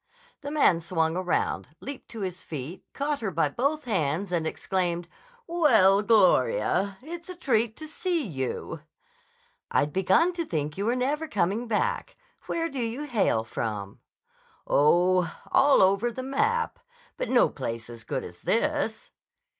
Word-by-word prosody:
The 285 - -5
man 290 - +4
swung 165 -1 0
around, 180 -4 -1
leaped 280 0 -8
to 225 - -7
his 185 -2 -4
feet, 155 +4 -6
caught 290 -1 -2
her 215 - -1
by 165 -4 +1
both 280 - -1
hands, 180 - -1
and 165 -3 0
exclaimed: 175 -1 -1 0.4
"Well, 225 - +4
Gloria! 215 - +3
It's 340 +3 -8
a 365 - -6
treat 235 -9 0
to 310 - -7
see 335 -1 -1
you." 135 - -4 0.9
"I'd 145 - +1
begun 190 - +3
to 340 -1 -2
think 150 - -3
you 200 +2 -2
were 240 - +2
never 290 +5 -1
coming 210 - 0
back. 475 - -1 0.3
Where 330 0 -1
do 275 -5 -6
you 235 +5 -3
hail 220 - +1
from?" 105 -3 -4 0.7
"Oh, 175 +3 +3 0.2
all 270 -4 +5
over 200 +5 +3
the 255 +3 -6
map. 450 - 0 0.4
But - - -3
no 250 - +5
place 115 -4 -5
as 115 -2 -10
good - - -3
as 90 0 -11
this." 290 -2 -1
215 Hz, 150 wpm, -27 LUFS, -, 0.9 s, all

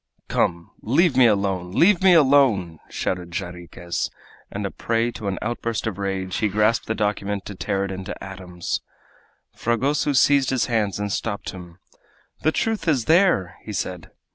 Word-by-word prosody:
"Come, 85 -1 0
leave 140 - +3
me 130 -2 +7
alone! 95 -4 0
leave 180 - +4
me 185 -2 +6
alone!" 130 - +4
shouted 90 -2 -3
Jarriquez, 90 -2 -4 0.4
and, - - -4
a - - -3
prey 115 +1 0
to 110 -3 -6
an 95 - -2
outburst 115 -1 -2
of 105 -3 -3
rage, 95 -2 -2
he 110 - +1
grasped 105 +3 +1
the 110 - -1
document 105 -2 -2
to 105 - -6
tear 100 0 -1
it 95 -1 -4
to - - -7
atoms. 90 -3 -5 0.7
Fragoso 135 +5 0
seized 140 0 +4
his 130 -2 +1
hands 110 -5 0
and 105 0 -3
stopped 100 +1 -3
him. 90 -2 -11 0.6
"The 155 - +3
truth 215 -1 -1
is 135 -8 +2
there!" 160 - +3
he 105 - -7
said. 90 -3 -4
105 Hz, 165 wpm, -23 LUFS, 95-130 Hz, 0.7 s, me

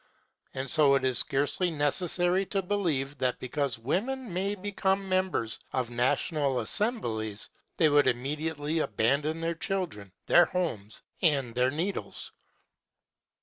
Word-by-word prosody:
And 130 +1 -3
so 140 0 +5
it 135 -1 +1
is 130 -2 +2
scarcely 145 +6 +1
necessary 175 +4 +1
to 195 -2 -1
believe 155 -9 -1
that 130 -1 0
because 130 -1 -2
women 215 - -2
may 195 +3 -1
become 195 -1 -1
members 185 - 0
of 125 -2 -1
national 130 +3 +1
assemblies, 110 - -1 0.3
they 160 - +5
would 145 -2 +4
immediately 150 +5 -1
abandon 140 +7 0
their 165 +1 0
children, 160 - -3
their 175 - +6
homes, 115 - -3 0.2
and 140 -8 +2
their 125 +1 +2
needles. 170 +8 -4
150 Hz, 125 wpm, -29 LUFS, 130-185 Hz, 0.3 s, their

